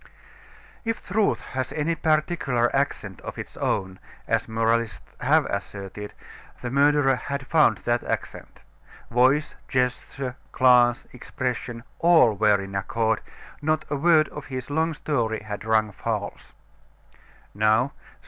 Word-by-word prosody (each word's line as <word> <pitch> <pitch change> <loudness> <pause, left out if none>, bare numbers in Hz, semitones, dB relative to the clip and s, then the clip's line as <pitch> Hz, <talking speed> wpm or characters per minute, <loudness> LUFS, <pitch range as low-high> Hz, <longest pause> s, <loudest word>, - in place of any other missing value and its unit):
If 225 -1 -3
truth 205 +2 +1
has 130 -1 -4
any 155 +2 0
particular 155 -6 +1
accent 120 -8 -2
of - - -7
its - - -8
own, 95 -1 -2 0.3
as - - 0
moralists 115 -3 -1
have - - +3
asserted, 100 +1 -6 0.4
the 125 - -5
murderer 140 -1 +4
had 140 +1 -5
found 155 +2 +4
that 120 0 +1
accent. - - -5 0.5
Voice, 130 +5 +3
gesture, 130 0 -2
glance, 125 -2 +4
expression, 125 -2 -4 0.2
all 165 -9 +6
were 105 0 +3
in 95 0 -7
accord; 110 +3 0 0.4
not 155 +1 0
a - - +1
word 155 +1 +4
of 145 - -9
his 130 0 -6
long 160 +2 +1
story 115 -8 -1
had 105 -1 -6
rung 110 -1 +2
false. - - -4 1.0
"Now," 110 +6 +2
said - - -25
M. - - -30
125 Hz, 130 wpm, -25 LUFS, 110-150 Hz, 1.0 s, all